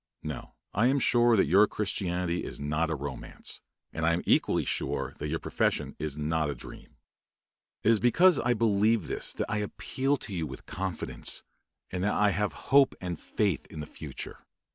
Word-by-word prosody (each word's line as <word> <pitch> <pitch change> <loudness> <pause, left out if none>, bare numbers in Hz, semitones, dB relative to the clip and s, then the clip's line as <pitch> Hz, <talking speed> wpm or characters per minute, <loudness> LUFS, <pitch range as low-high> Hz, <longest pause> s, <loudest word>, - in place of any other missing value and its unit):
No; - - -6 0.2
I 115 +5 +3
am 135 +2 +3
sure 120 -3 +4
that - - +5
your 100 +7 +6
Christianity 90 -4 -1
is - - -5
not 75 +3 0
a 80 - 0
romance, 70 -1 -5 0.3
and 80 - -3
I 80 +1 +4
am 85 - -1
equally - - +3
sure - - -1
that 75 - -3
your 80 +2 -1
profession - - -1
is 75 -1 -4
not 75 0 0
a 70 - -3
dream. - - -11 0.9
It 110 - +5
is 110 - +4
because 170 - +5
I 120 0 +2
believe 110 0 +3
this - - -2
that - - -2
I 105 - -1
appeal 135 +6 -1
to 105 - -7
you 80 -4 -2
with 65 -1 -9
confidence, 95 -3 -3 0.5
and 90 0 -2
that 105 - +1
I 105 -1 +4
have 105 +3 0 0.2
hope 140 -1 +6
and 90 -2 -4
faith 100 -9 -1
in 80 - -9
the 75 - -4
future. - - -8
95 Hz, 185 wpm, -29 LUFS, 80-110 Hz, 0.9 s, your